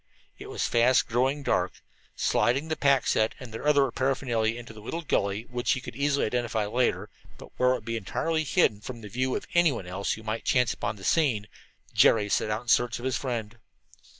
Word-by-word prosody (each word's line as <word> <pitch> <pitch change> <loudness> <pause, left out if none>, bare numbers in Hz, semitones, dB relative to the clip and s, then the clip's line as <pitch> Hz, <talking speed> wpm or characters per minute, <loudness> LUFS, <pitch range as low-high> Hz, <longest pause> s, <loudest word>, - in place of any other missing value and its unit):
It - - -9
was - - -2
fast 120 +2 +3
growing 130 +5 0
dark. - - 0 0.4
Sliding 130 +8 +1
the 160 - 0
pack 140 -3 +3
set 110 0 +1
and 120 -4 -10
their 115 - -4
other 140 -3 +4
paraphernalia 120 -4 0
into 120 -1 -10
a 105 - -11
little 165 +10 -5
gully 100 -6 0
which 120 0 -1
he 130 - -3
easily 140 0 +1
could 110 - -4
identify 120 -3 0
later, 120 +4 0 0.3
but - - -13
where 125 - +4
it 130 - +3
would - - -8
be 115 -1 -2
entirely 160 - -1
hidden 135 - +2
from 120 +1 -8
the 105 - -9
view 130 +4 -1
of - - -4
anyone 160 - +2
else 95 +3 -2
who 110 - -8
might 110 +1 -3
chance 125 -2 +2
upon - - -3
the 95 - -13
scene, 125 - +2 0.5
Jerry 105 -2 +4
set 105 - +1
out 105 +2 -2
in - - -24
search 120 +1 +3
of 120 - -8
his 130 - 0
friend. 120 -3 -4
120 Hz, 210 wpm, -27 LUFS, 110-135 Hz, 0.5 s, other